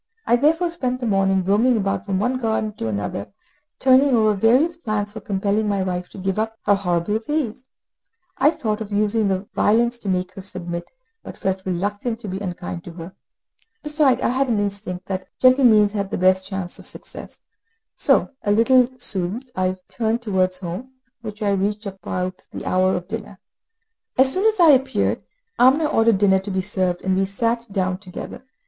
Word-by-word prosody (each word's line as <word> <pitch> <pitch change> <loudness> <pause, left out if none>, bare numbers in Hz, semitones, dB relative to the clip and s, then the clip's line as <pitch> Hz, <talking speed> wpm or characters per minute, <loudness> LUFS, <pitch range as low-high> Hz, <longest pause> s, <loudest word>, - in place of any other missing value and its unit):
I 240 - +4
therefore 325 +7 +2
spent 255 -7 -2
the 250 - -3
morning 195 -3 +2
roaming 220 +6 +3
about 195 0 -2
from 195 -1 0
one 250 +6 0
garden 220 -2 -1
to 115 - -3
another, 100 -1 -3 0.5
turning 260 0 +4
over 215 -2 +3
various 250 - +3
plans 215 -9 -3
for 220 - -7
compelling 205 +2 0
my 200 -2 0
wife 180 -1 -3
to - - -13
give 190 +1 -2
up 225 0 -2
her 205 - +5
horrible 195 +1 0
ways; 260 -5 -2 0.7
I 280 - +6
thought 220 -8 -2
of 215 -1 -6
using 205 -2 +1
violence 235 +3 +2
to 205 - -5
make 185 0 -1
her 195 - -8
submit, 175 -2 -6 0.3
but - - -10
felt 190 0 -2
reluctant 205 +6 -2
to 215 - -7
be 190 0 -4
unkind 175 -3 -5
to 175 - -9
her. 170 +2 -9 0.7
Besides, 300 -4 +2
I - - +2
had 260 +2 0
an 220 -3 +1
instinct 200 -3 -4
that 190 -1 -4
gentle 255 +1 +5
means 210 -3 +5
had 200 -2 -3
the - - -3
best 185 +1 +3
chance 190 -3 -5
of - - -9
success; - - -8 0.6
so, - - +3
a 205 - 0
little 245 +3 +4
soothed, 225 +2 -1
I 185 0 0
turned 230 +1 -1
towards 185 -4 +1
home, 185 +9 -7 0.3
which 215 -1 -7
I 205 - +2
reached 205 +2 -1
about 185 -1 -5
the - - -8
hour 185 +1 +2
of 180 0 -5
dinner. 210 -2 -6 0.8
As 265 +1 +4
soon 390 +4 +2
as 435 -2 +1
I 335 -3 +8
appeared, 265 -1 +1 0.4
Amina 265 +6 +5
ordered 225 -7 +3
dinner 190 -1 +4
to 195 +2 -7
be 190 -1 -1
served, 185 -3 0
and 190 0 +1
we 195 +1 +2
sat 230 +4 -1
down 185 -2 -1
together. 190 +5 -9
205 Hz, 185 wpm, -22 LUFS, 190-240 Hz, 0.8 s, I